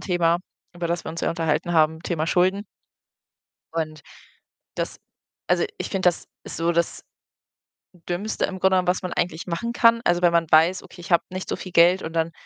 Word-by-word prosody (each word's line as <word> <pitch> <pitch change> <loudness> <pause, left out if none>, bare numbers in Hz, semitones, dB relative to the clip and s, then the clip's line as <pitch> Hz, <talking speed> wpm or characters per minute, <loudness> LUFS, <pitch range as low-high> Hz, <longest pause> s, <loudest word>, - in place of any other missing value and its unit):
Thema, 175 -2 +1 0.4
über 175 -1 -3
das 170 0 -2
wir - - -4
uns 165 - -6
ja - - +1
unterhalten 165 +1 -1
haben, 160 -1 +3
Thema 165 -3 -2
Schulden. 185 +4 +2 1.1
Und 155 -2 -4 0.7
das - - -4 0.5
also, - - +3
ich - - -4
finde, 190 -2 -1
das 175 - -3 0.2
ist - - -8
so 165 +1 +1
das 170 0 -1 1.1
Dümmste 190 +5 -1
im 190 -1 -6
Grunde 190 +1 +3
genommen, 180 -1 +1
was 180 +2 +1
man 180 - -4
eigentlich 170 -2 -2
machen 180 +7 -3
kann. 230 -1 +4
Also, 175 0 +2
wenn 175 -1 +4
man 170 -1 +2
weiß: 165 +4 +4
„Okay, 180 - -14
ich 175 +2 -6
habe 170 - +5
nicht 185 0 -6
so - - -1
viel 185 - -8
Geld“, 175 +3 +5
und 160 - -5
dann 165 0 0
175 Hz, 195 wpm, -23 LUFS, 165-185 Hz, 1.1 s, habe